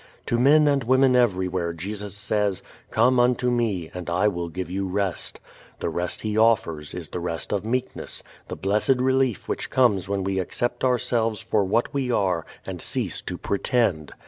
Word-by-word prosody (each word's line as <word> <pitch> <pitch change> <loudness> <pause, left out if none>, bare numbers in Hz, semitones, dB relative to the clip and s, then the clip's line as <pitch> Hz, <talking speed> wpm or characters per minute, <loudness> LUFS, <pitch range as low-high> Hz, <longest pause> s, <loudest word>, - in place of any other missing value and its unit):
To 120 - 0
men 150 +4 +6
and 140 -2 +2
women 130 +1 +4
everywhere 95 -7 +1
Jesus 100 +4 -5
says, 105 -2 0 0.3
"Come 125 +3 +3
unto 125 0 +3
me, 105 -9 -1
and 90 -1 -6
I 90 +4 +2
will 85 -3 -4
give 90 +2 -4
you 95 +1 -2
rest." 95 -2 -2 0.4
The - - -1
rest 90 0 -3
He 105 -1 -2
offers 105 -10 +2
is - - -6
the - - -4
rest 85 +1 -3
of 100 - 0
meekness, 125 +3 -3 0.2
the - - -5
blessed 105 +7 +1
relief 130 -2 +1
which - - -3
comes 105 -8 +2
when 100 -1 -1
we 95 0 -1
accept 120 +6 -2
ourselves 115 -4 +1
for 105 +1 +1
what 105 +5 0
we 135 -3 -1
are 95 -8 +1 0.2
and - - -6
cease - - -2
to 90 - -5
pretend. 100 - 0
105 Hz, 175 wpm, -24 LUFS, 90-120 Hz, 0.4 s, men